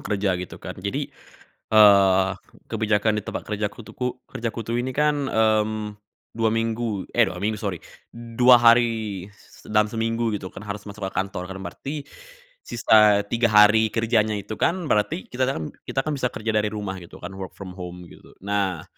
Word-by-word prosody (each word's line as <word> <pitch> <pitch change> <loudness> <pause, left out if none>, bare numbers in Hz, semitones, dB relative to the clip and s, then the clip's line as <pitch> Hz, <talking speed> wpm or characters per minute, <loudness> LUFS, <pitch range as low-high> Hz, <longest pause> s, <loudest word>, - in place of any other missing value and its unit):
kerja, 100 -2 0
gitu, 90 - -7
kan, - - -7
jadi, - - -3 0.6
eee, 100 -3 +6 0.4
kebijakan 110 -1 +1
di - - -11
tempat - - -6
kerjaku 105 +1 -3
tuh - - -13
ku 125 - -1 0.2
kerjaku 115 -2 -4
tuh 115 - -1
ini, 125 +2 -1
kan, 150 +3 +2 0.2
mmm, 110 -1 +1 0.4
2 115 -1 +1
minggu 115 -2 -2
eh, 120 - +6
2 95 -3 -3
minggu, 105 +3 -1
sori, 100 -5 -4 0.3
2 120 +1 +4
hari 115 -5 +3 0.4
dalam 105 0 +2
seminggu, 115 +1 -1
gitu, 95 -2 -6
kan, - - -10
harus 100 0 -5
masuk 100 -1 -6
ke - - -7
kantor, 95 -1 -3
kan 95 - -7
berarti 145 +7 -6 0.6
sisa 105 -3 +4
3 120 0 +3
hari 105 +1 +6
kerjanya 110 -1 +1
itu, 100 +1 -6
kan, 170 - +2 0.2
berarti 105 - +1
kita, 130 +1 0
kan 80 - -3 0.2
kita 135 - -1
kan, 155 - -2
bisa 135 -3 0
kerja 110 -2 -3
dari 105 -1 +1
rumah 105 -3 -5
gitu 85 - -13
kan, 90 - -6
work 95 -2 -7
from 95 -2 -8
home 90 -1 -7
gitu. - - -17
Nah, 100 -4 -1
110 Hz, 175 wpm, -24 LUFS, 100-115 Hz, 0.6 s, eee